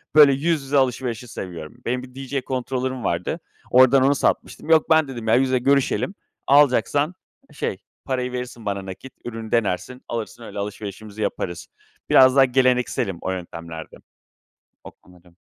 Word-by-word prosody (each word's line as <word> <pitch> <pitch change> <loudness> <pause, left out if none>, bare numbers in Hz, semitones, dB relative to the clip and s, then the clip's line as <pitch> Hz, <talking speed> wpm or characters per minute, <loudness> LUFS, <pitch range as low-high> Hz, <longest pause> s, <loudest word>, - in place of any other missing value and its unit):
Böyle 145 -3 +8
yüz 155 +2 0
yüze 140 +1 0
alışverişi 125 -3 0
seviyorum. 85 -8 -7
Benim 125 +1 -1
bir 125 0 -13
DJ 135 0 -3
controller'ım 130 0 -3
vardı, 85 +1 -1 0.3
oradan 130 +1 +6
onu 140 +2 +4
satmıştım. 155 - -1
Yok, 160 -1 +4
ben 160 -2 +5
dedim, 120 -4 -7
“ya, 110 - +5
yüze 130 0 +2
görüşelim, 140 - +1 0.3
alacaksan, 145 +3 +3 0.4
şey, - - -3 0.3
parayı 125 -2 -2
verirsin 125 -2 -6
bana 100 -1 -3
nakit, 95 +8 -9
ürünü 115 -2 -6
denersin, 115 +3 -1
alırsın 115 0 -5
öyle 105 - -7
alışverişimizi 105 +1 -6
yaparız“. 85 -4 -3 0.4
Biraz 130 0 +7
daha 135 -1 +7
gelenekselim 125 -7 +1
o 95 - -2
yöntemlerde. 85 -3 -7 0.9
O - - -10
konuda. 90 -1 -22
125 Hz, 145 wpm, -22 LUFS, 105-135 Hz, 0.9 s, Böyle